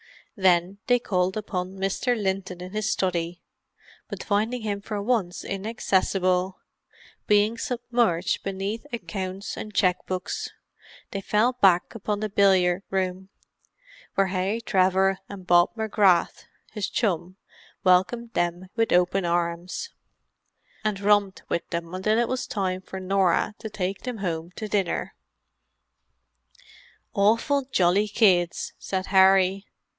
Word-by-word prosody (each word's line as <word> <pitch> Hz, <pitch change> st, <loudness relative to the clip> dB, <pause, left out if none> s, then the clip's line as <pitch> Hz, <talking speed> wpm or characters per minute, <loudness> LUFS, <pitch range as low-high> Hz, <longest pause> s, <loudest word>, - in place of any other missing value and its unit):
Then 185 Hz, -1 st, +2 dB
they 245 Hz, -1 st, +5 dB
called 185 Hz, -4 st, 0 dB
upon 185 Hz, -3 st, -3 dB
Mr. 195 Hz, +5 st, 0 dB
Linton 190 Hz, -2 st, -2 dB
in 180 Hz, +1 st, -7 dB
his 215 Hz, +1 st, -1 dB
study, 175 Hz, -2 st, -1 dB, 0.7 s
but -, -, -6 dB
finding 220 Hz, +3 st, 0 dB
him 205 Hz, -2 st, -2 dB
for 210 Hz, 0 st, -4 dB
once 200 Hz, -5 st, -1 dB
inaccessible, 190 Hz, -3 st, 0 dB, 0.7 s
being 210 Hz, +2 st, +3 dB
submerged 235 Hz, -8 st, 0 dB
beneath 195 Hz, +6 st, -4 dB
accounts 195 Hz, -4 st, -5 dB
and 215 Hz, -1 st, -8 dB
cheque 185 Hz, -3 st, +2 dB
books, 185 Hz, 0 st, -3 dB, 0.6 s
they 195 Hz, -, -3 dB
fell 215 Hz, +5 st, +2 dB
back 190 Hz, -7 st, +3 dB
upon 210 Hz, -2 st, -3 dB
the 215 Hz, 0 st, -2 dB
billiard 190 Hz, -3 st, +3 dB
room, 190 Hz, 0 st, -2 dB, 0.9 s
where 195 Hz, -1 st, +3 dB
Harry 190 Hz, +4 st, -1 dB
Trevor 190 Hz, -3 st, +2 dB
and 195 Hz, -2 st, -9 dB
Bob 175 Hz, +2 st, +4 dB
McGrath, 205 Hz, -5 st, +2 dB, 0.3 s
his 210 Hz, -3 st, -3 dB
chum, 185 Hz, -4 st, -1 dB, 0.5 s
welcomed 205 Hz, +6 st, +2 dB
them 175 Hz, +1 st, -1 dB
with 225 Hz, -1 st, +1 dB
open 180 Hz, +1 st, +3 dB
arms, 170 Hz, -, -2 dB, 0.9 s
and 210 Hz, -2 st, -1 dB
romped 205 Hz, -1 st, +2 dB
with 170 Hz, -, -2 dB
them 170 Hz, 0 st, -4 dB
until 215 Hz, +4 st, +1 dB
it 235 Hz, 0 st, +2 dB
was 255 Hz, 0 st, -2 dB
time 185 Hz, -2 st, -2 dB
for 190 Hz, 0 st, -8 dB
Norah 190 Hz, +1 st, +1 dB
to 220 Hz, -, -6 dB
take 195 Hz, -2 st, -3 dB
them 250 Hz, -2 st, -5 dB
home 170 Hz, -4 st, -3 dB
to 215 Hz, -, -5 dB
dinner. 200 Hz, -4 st, -1 dB, 2.0 s
"Awful 230 Hz, +8 st, +2 dB
jolly 190 Hz, 0 st, +3 dB
kids," 185 Hz, -5 st, +2 dB
said 190 Hz, -1 st, -3 dB
Harry. 190 Hz, 0 st, +4 dB
195 Hz, 125 wpm, -25 LUFS, 185-215 Hz, 2.0 s, they